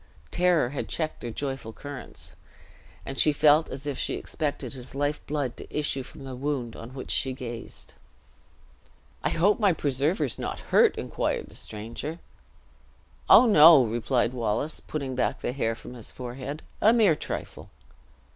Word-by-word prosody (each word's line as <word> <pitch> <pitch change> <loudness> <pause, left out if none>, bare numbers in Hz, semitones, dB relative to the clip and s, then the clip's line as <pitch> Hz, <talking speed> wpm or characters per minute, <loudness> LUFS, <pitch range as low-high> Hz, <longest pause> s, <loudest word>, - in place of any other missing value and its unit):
Terror 175 -7 +3
had 140 - -4
checked 155 -2 -3
their 120 - -4
joyful 135 -1 -4
currents; 145 +1 -9 0.7
and 135 - -5
she 155 - +5
felt 150 +2 +4
as 135 +2 -7
if 145 -2 -3
she - - -1
expected 145 -2 -3
his 130 0 -9
life 145 +1 -1
blood 145 -5 -2
to - - -10
issue 145 -2 -1
from 135 +2 -11
the 130 -1 -6
wound 130 -4 -3
on 120 +3 -9
which 130 - -6
she 130 -1 +1
gazed. 120 -3 -7 1.3
"I - - +2
hope 200 +7 +3
my 200 -4 +4
preserver 145 +3 0
is 130 - -2
not - - -4
hurt?" - - +6
inquired - - -2
the - - -16
stranger. 115 +9 -6 1.1
"Oh, 250 - +9
no!" 160 - +8
replied 120 +2 0
Wallace, 120 +5 -1
putting 140 -4 -4
back 125 - -1
the 120 - -2
hair 115 -4 0
from 120 - -10
his 120 -4 -6
forehead; 130 +4 -6 0.2
"a 215 - +7
mere 215 -9 +5
trifle!" - - -6
140 Hz, 160 wpm, -27 LUFS, 125-150 Hz, 1.3 s, Oh